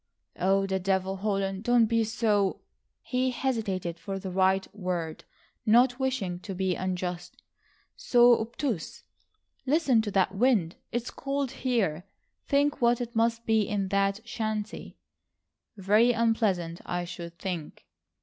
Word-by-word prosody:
"Oh, 195 Hz, +2 st, +2 dB
the 190 Hz, -1 st, -1 dB
devil, 190 Hz, 0 st, 0 dB
Holland, 195 Hz, -1 st, -1 dB
don't 240 Hz, -1 st, +4 dB
be 230 Hz, 0 st, +2 dB
so—" 210 Hz, -3 st, +1 dB, 0.4 s
he 255 Hz, 0 st, 0 dB
hesitated 205 Hz, -10 st, -2 dB
for 195 Hz, +3 st, -5 dB
the 190 Hz, -1 st, -6 dB
right 190 Hz, +1 st, +2 dB
word, 180 Hz, -5 st, -4 dB, 0.4 s
not 245 Hz, +3 st, +4 dB
wishing 230 Hz, -10 st, -1 dB
to 195 Hz, +1 st, -7 dB
be 190 Hz, 0 st, 0 dB
unjust,—"so 185 Hz, -, 0 dB
obtuse. 225 Hz, -, -4 dB, 0.6 s
Listen 275 Hz, -5 st, +3 dB
to 215 Hz, -, -3 dB
that 190 Hz, -1 st, +1 dB
wind! 205 Hz, -6 st, +2 dB, 0.2 s
It's 240 Hz, +1 st, -3 dB
cold 275 Hz, -1 st, -2 dB
here. 215 Hz, -, -1 dB, 0.4 s
Think 285 Hz, 0 st, +1 dB
what 240 Hz, 0 st, +3 dB
it 240 Hz, -1 st, -5 dB
must 230 Hz, +1 st, +1 dB
be 220 Hz, -1 st, +3 dB
in 200 Hz, -2 st, -1 dB
that 200 Hz, +3 st, 0 dB
shanty." 215 Hz, -2 st, -4 dB, 0.8 s
"Very 210 Hz, +5 st, +4 dB
unpleasant, 215 Hz, -7 st, 0 dB
I 175 Hz, 0 st, -3 dB
should 170 Hz, -1 st, -8 dB
think." 180 Hz, -6 st, -6 dB
205 Hz, 130 wpm, -28 LUFS, 185-235 Hz, 0.8 s, don't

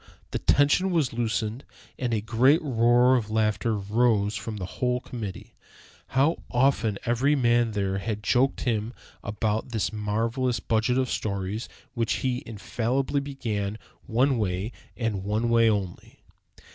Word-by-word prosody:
The -, -, -2 dB
tension 145 Hz, +7 st, +3 dB
was 160 Hz, -9 st, +1 dB
loosened, 115 Hz, +1 st, -2 dB, 0.4 s
and 125 Hz, -2 st, -1 dB
a 110 Hz, -2 st, 0 dB
great 120 Hz, +8 st, +4 dB
roar 120 Hz, -1 st, +4 dB
of 110 Hz, -4 st, -1 dB
laughter 110 Hz, +1 st, +1 dB
rose 105 Hz, 0 st, +1 dB
from 105 Hz, +1 st, -5 dB
the 95 Hz, -, -4 dB, 0.2 s
whole 125 Hz, 0 st, +2 dB
committee. 110 Hz, -7 st, -7 dB, 0.6 s
How 145 Hz, +5 st, +4 dB
often 120 Hz, -5 st, +2 dB
every 130 Hz, +5 st, +2 dB
man 120 Hz, -3 st, +2 dB
there 100 Hz, -1 st, -1 dB
had 105 Hz, +1 st, -4 dB
joked 130 Hz, +4 st, +2 dB
him 115 Hz, -1 st, -1 dB, 0.3 s
about 105 Hz, +2 st, -2 dB
that 110 Hz, -2 st, -1 dB
marvelous 115 Hz, +4 st, -1 dB
budget 115 Hz, +3 st, +1 dB
of 130 Hz, -2 st, 0 dB
stories 100 Hz, +2 st, -3 dB, 0.2 s
which 115 Hz, -4 st, 0 dB
he 125 Hz, -1 st, 0 dB
infallibly 120 Hz, +5 st, -1 dB
began 110 Hz, -7 st, -3 dB, 0.3 s
one 125 Hz, +2 st, +2 dB
way 95 Hz, +2 st, -1 dB, 0.3 s
and 110 Hz, -5 st, -2 dB
one 110 Hz, +4 st, 0 dB
way 115 Hz, -1 st, +5 dB
only! 100 Hz, -4 st, -4 dB
115 Hz, 140 wpm, -26 LUFS, 105-125 Hz, 0.6 s, way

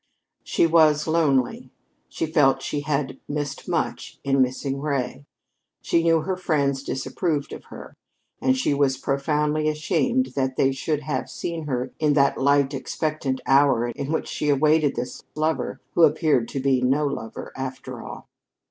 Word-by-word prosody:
She -, -, +2 dB
was 155 Hz, -2 st, +4 dB
lonely. 150 Hz, -6 st, +1 dB, 0.4 s
She -, -, -2 dB
felt 135 Hz, -4 st, +3 dB
she 145 Hz, -, -2 dB
had 145 Hz, -1 st, -2 dB
missed 145 Hz, -1 st, -4 dB
much -, -, -2 dB
in 135 Hz, -1 st, +2 dB
missing 135 Hz, +2 st, -1 dB
Ray. 140 Hz, -1 st, -3 dB, 0.6 s
She 170 Hz, -, +2 dB
knew 165 Hz, -1 st, +3 dB
her 190 Hz, +3 st, -2 dB
friends 140 Hz, -6 st, 0 dB
disapproved 145 Hz, +2 st, -2 dB
of -, -, -9 dB
her; -, -, -11 dB, 0.5 s
and 260 Hz, 0 st, +2 dB
she 255 Hz, -, +1 dB
was 140 Hz, -2 st, +2 dB
profoundly 150 Hz, +2 st, 0 dB
ashamed 235 Hz, +12 st, 0 dB
that 130 Hz, -1 st, 0 dB
they 135 Hz, -, +3 dB
should 145 Hz, +3 st, -2 dB
have 145 Hz, -4 st, -3 dB
seen 165 Hz, -3 st, -5 dB
her 130 Hz, -2 st, -2 dB
in 150 Hz, -2 st, +3 dB
that 140 Hz, -1 st, +3 dB
light, 140 Hz, 0 st, +3 dB
expectant 140 Hz, -1 st, -2 dB
hour 135 Hz, -3 st, +4 dB
in 135 Hz, +5 st, -4 dB
which 160 Hz, -, -1 dB
she 150 Hz, -, -2 dB
awaited 150 Hz, +1 st, +3 dB
this 120 Hz, +1 st, -5 dB
lover 155 Hz, +1 st, -1 dB
who -, -, +2 dB
appeared 150 Hz, -6 st, +4 dB
to 135 Hz, -, -4 dB
be 130 Hz, -1 st, +2 dB
no 135 Hz, +4 st, +2 dB
lover, 115 Hz, -6 st, -5 dB
after 130 Hz, -1 st, -6 dB
all. -, -, -9 dB
145 Hz, 155 wpm, -24 LUFS, 135-155 Hz, 0.6 s, was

